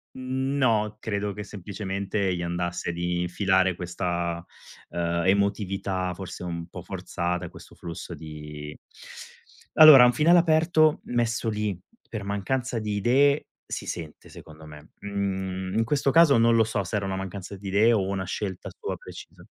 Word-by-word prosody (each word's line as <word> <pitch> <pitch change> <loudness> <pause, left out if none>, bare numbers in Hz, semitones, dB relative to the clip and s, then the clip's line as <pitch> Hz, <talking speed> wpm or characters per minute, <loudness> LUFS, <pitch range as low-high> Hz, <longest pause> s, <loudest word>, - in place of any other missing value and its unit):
No, 130 -5 0
credo 100 -2 -3
che 105 +1 -7
semplicemente 100 -1 -3
gli 85 - -3
andasse 85 0 -2
di 85 +1 -2
infilare 95 0 +1
questa, 85 -1 -3 0.4
uhm, 85 0 -1
emotività 95 -1 0
forse 95 0 -8
un 85 -1 -5
po' 90 0 -9
forzata, 90 -1 -3
questo - - -14
flusso 85 -1 -8
di 75 -1 -9 1.0
allora 155 -5 +10
un 125 - +5
finale 170 +5 +5
aperto 160 -1 +3
messo 120 -1 -1
lì 105 -4 -2 0.3
per 110 -3 -5
mancanza 115 +5 -2
di 105 -1 -2
idee 140 +7 +3 0.2
si - - -6
sente, 80 -3 -7
secondo 80 0 -13
me. 75 0 -13
Mhmm, 95 -2 -3
in 115 - +3
questo 140 +2 +1
caso 145 -3 +6
non 115 0 +4
lo 115 - +5
so 110 -2 -2
se 95 +2 -3
era 100 - -1
una 95 0 -2
mancanza 95 +1 -6
di 100 +1 -8
idee 105 +5 +4
o 105 -4 +2
una 95 0 -2
scelta 95 0 -4
sua - - -4
precisa. - - -12
100 Hz, 155 wpm, -26 LUFS, 90-115 Hz, 1.0 s, allora